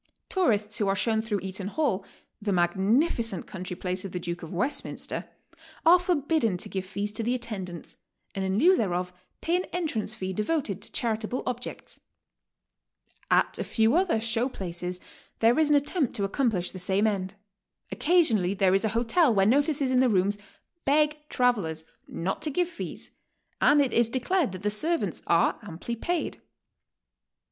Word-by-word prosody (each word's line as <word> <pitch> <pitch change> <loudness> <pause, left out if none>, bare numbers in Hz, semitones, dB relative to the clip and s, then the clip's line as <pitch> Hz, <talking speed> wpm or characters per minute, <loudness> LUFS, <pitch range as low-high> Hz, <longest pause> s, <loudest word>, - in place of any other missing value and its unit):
Tourists 215 - +1
who 205 - +1
are 195 - +2
shown 220 +2 +1
through 215 -3 -2
Eaton 190 0 -5
Hall, 210 -5 0 0.4
the 205 -1 -1
magnificent 195 - +1
country 185 -3 -6
place 185 0 -2
of 195 - -6
the 180 - -3
Duke 175 0 -5
of 165 - -8
West 250 +11 0
minster, - - -3 0.6
are 350 +2 +8
forbidden 305 - +1
to - - -4
give 190 -1 -4
fees 205 +2 -2
to 215 - -3
the 240 +3 0
attendants, 195 -8 -6 0.4
and 195 - -3
in 190 +1 0
lieu 360 - +6
thereof 180 - -1 0.3
pay 335 - +1
an 365 - -2
entrance 315 -11 -3
fee 190 0 -4
devoted 210 - -1
to - - -6
charitable 225 +1 -2
objects. 250 0 -5 1.3
At - - +2
a - - 0
few 225 +1 +2
other 355 -9 +2
"show 230 +3 0
places" 180 -4 -5 0.4
there 230 +5 +4
is 310 -2 +3
an 295 - +5
attempt 290 -1 +1
to 200 -1 0
accom 245 +5 +1
plish 185 -5 -2
the 185 - -8
same 190 +3 +1
end. 195 -3 -1 0.6
Occasionally 235 - +3
there 190 -1 +3
is 195 - +3
a 220 - +1
hotel 245 +6 +3
where 195 -3 +3
notices 280 +3 +2
in 255 - +4
the 255 -1 +4
rooms 200 0 +2 0.5
beg 300 +2 +3
travelers 200 -11 +1 0.2
not 190 +3 -3
to 310 - -1
give 350 +4 +1
fees - - -7 0.5
and 295 0 +5
it 275 -3 +2
is 235 -1 +3
declared 265 - 0
that 185 +1 -8
the 210 - +1
servants 320 +11 0
are - - +3
amply 210 +3 -6
paid. 345 +8 -2
220 Hz, 170 wpm, -27 LUFS, 190-280 Hz, 1.3 s, are